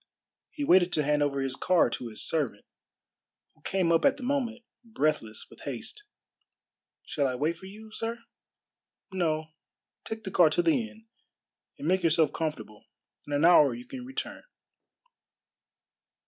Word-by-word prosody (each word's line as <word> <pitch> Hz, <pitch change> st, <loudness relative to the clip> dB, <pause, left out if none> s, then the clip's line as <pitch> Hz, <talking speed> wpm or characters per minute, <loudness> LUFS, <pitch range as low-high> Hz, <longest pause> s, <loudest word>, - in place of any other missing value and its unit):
He 295 Hz, -, -5 dB
waited 180 Hz, -8 st, +5 dB
to 150 Hz, -, +2 dB
hand 150 Hz, +1 st, +2 dB
over 140 Hz, -1 st, +1 dB
his 135 Hz, -1 st, -2 dB
car 180 Hz, +4 st, +3 dB
to 120 Hz, -, -4 dB
his 110 Hz, -, -2 dB
servant, 150 Hz, -7 st, -1 dB, 0.9 s
who -, -, -30 dB
came 185 Hz, -3 st, +1 dB
up 165 Hz, -, +3 dB
at 280 Hz, 0 st, +4 dB
the 265 Hz, -, -9 dB
moment, 245 Hz, -3 st, -1 dB, 0.2 s
breathless 155 Hz, -, -1 dB
with -, -, -16 dB
haste. 425 Hz, -, -6 dB, 1.0 s
"Shall 140 Hz, -2 st, 0 dB
I 130 Hz, -, -2 dB
wait 150 Hz, +6 st, 0 dB
for 190 Hz, +3 st, -12 dB
you, 215 Hz, +3 st, -12 dB
sir?" 230 Hz, +2 st, -3 dB, 0.9 s
"No, 160 Hz, -4 st, -1 dB, 0.5 s
take 220 Hz, 0 st, -6 dB
the 190 Hz, -, -5 dB
car 175 Hz, -4 st, +6 dB
to 175 Hz, +3 st, +1 dB
the 220 Hz, +8 st, +2 dB
inn, 220 Hz, 0 st, -18 dB, 0.7 s
and 150 Hz, -, -5 dB
make 185 Hz, +2 st, +3 dB
yourself 160 Hz, -2 st, +3 dB
comfortable. 150 Hz, -10 st, -4 dB, 0.4 s
In 145 Hz, -, -4 dB
an 145 Hz, +3 st, +3 dB
hour 150 Hz, -7 st, +6 dB
you 120 Hz, +1 st, -9 dB
can 255 Hz, -2 st, -8 dB
return." 265 Hz, +1 st, -5 dB
170 Hz, 155 wpm, -28 LUFS, 150-220 Hz, 1.0 s, car